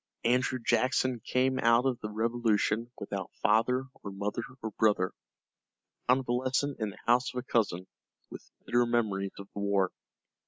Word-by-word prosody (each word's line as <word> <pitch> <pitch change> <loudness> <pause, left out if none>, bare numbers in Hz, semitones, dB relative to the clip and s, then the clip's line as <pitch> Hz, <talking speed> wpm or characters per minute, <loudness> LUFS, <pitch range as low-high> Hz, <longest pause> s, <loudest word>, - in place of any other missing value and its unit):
Andrew 125 +2 +2
Jackson 125 +1 +1
came 130 +3 +1
out 115 +2 +4
of 130 -3 +1
the 105 - -5
Revolution 115 0 0
without 100 -2 -5
father 115 +4 +3 0.2
or 100 - -6
mother 100 +3 -3 0.2
or 110 - -3
brother, 105 -3 +2 1.0
a 125 - +7
convalescent 130 +2 -1
in 110 -2 -1
the 100 - -11
house 125 +2 +3
of - - -8
a 125 - -2
cousin, 100 -8 0 0.5
with - - -10 0.2
bitter 120 0 +2
memories 105 -5 0
of 100 - -9
the - - -5
war. 100 -2 +1
115 Hz, 155 wpm, -30 LUFS, 105-125 Hz, 1.0 s, a